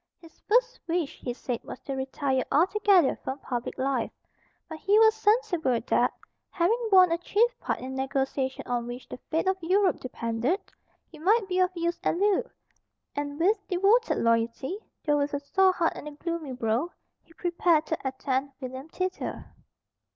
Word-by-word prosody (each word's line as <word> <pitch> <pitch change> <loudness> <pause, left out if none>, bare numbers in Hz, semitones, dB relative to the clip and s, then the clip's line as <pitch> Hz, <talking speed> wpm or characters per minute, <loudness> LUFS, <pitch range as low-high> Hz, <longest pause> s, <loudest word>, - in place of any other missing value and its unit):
His 330 -2 -17
first 485 +2 +2
wish, 330 -3 -2
he 245 - -4
said, 245 0 -4
was - - -8
to 275 - -5
retire 265 0 -1
altogether 375 +1 +4
from 265 - -3
public 245 -3 -4
life. 260 -3 0 0.6
But 320 -1 -8
he 405 +5 +3
was 440 0 +7
sensible 415 - +2
that, 235 - +2 0.4
having 450 +7 +1
borne 370 -3 +7
a 335 - +1
chief 460 +7 +2
part - - -2
in 260 +1 -6
the 265 - -2
negotiation 265 0 -1
on 240 -1 -2
which 245 +1 -7
the - - -8
fate 325 +4 0
of 380 0 +1
Europe 370 +2 +2
depended, 240 - -1 0.5
he 315 - -13
might 405 +5 +3
be 365 -1 0
of 365 0 +4
use 340 0 -1
at - - +1
Loo; 405 +1 +3 0.7
and, 290 +1 -4
with 400 +7 +3
devoted 400 +6 +3
loyalty, 230 - 0 0.3
though 295 -1 +3
with 285 0 -1
a - - -1
sore 375 +7 +3
heart 340 -2 0
and - - -8
a - - -6
gloomy 325 -2 -4
brow, 245 +6 0 0.3
he 330 - -23
prepared 340 -2 +2
to 320 - -2
attend 265 +1 -2
William 260 +2 -7
thither. 370 +2 -4
320 Hz, 175 wpm, -27 LUFS, 265-375 Hz, 0.7 s, was